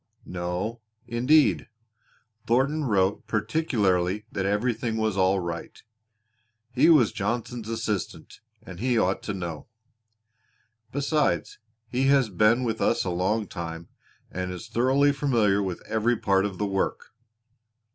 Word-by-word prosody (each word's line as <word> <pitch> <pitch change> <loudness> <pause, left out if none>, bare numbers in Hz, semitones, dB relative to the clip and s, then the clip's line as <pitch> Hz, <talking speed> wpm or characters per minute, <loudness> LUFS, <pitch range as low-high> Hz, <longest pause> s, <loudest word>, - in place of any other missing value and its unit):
"No, 90 +6 -4 0.2
indeed! 125 +6 +3 0.8
Thornton 140 +6 +1
wrote 100 -4 +1
particularly 105 - 0
that 95 -1 -2
everything 110 +2 -1
was 110 -2 0
all 95 0 +3
right. 85 -1 -6 0.9
He 140 +6 +4
was 145 -10 +5
Johnson's 115 +2 -3
assistant, 110 -5 -4 0.2
and 90 -1 -10
he 125 +1 +1
ought 95 -3 +1
to 105 - -4
know. 85 -5 -6 1.2
Besides, 145 +2 0 0.3
he 130 +3 0
has 135 -5 +3
been 110 +7 +3
with 115 -2 -2
us 115 - +2
a 90 - -1
long 95 +5 0
time, 85 -3 -7 0.4
and 90 +1 -4
is 90 -2 -7
thoroughly 135 +4 +3
familiar 115 -8 +2
with 95 -3 -4
every 115 +2 +1
part 95 -1 +2
of 95 -2 -8
the 105 - -1
work." 95 -1 -2
110 Hz, 125 wpm, -26 LUFS, 95-125 Hz, 1.2 s, was